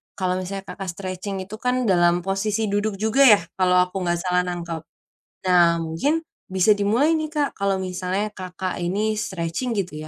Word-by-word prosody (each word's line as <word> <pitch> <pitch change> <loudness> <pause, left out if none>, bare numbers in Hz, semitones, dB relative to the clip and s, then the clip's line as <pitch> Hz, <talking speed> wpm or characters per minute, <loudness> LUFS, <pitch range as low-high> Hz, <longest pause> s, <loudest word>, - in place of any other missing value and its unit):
kalau 185 -1 -1
misalnya 195 +1 -5
Kakak 195 0 -6
stretching 190 +1 -5
itu 200 +3 -8
kan 250 +1 0
dalam 175 -4 +3
posisi 205 +3 -1
duduk 205 0 0
juga 220 +7 +3
ya, - - -3 0.2
kalau 180 -1 +4
aku 180 +1 -5
nggak 175 -2 0
salah 180 -1 +2
nangkep. 170 -2 -4 0.7
Nah, 175 -2 +5
mungkin 170 - -1 0.2
bisa 190 +3 +4
dimulai 220 +10 +2
nih 310 -1 -1
Kak, 295 -2 0
kalau 200 -1 0
misalnya 190 +3 -2
Kakak 185 -1 -5
ini 205 +5 0
stretching 205 +3 -3
gitu 180 -6 -2
190 Hz, 165 wpm, -23 LUFS, 180-215 Hz, 0.7 s, Nah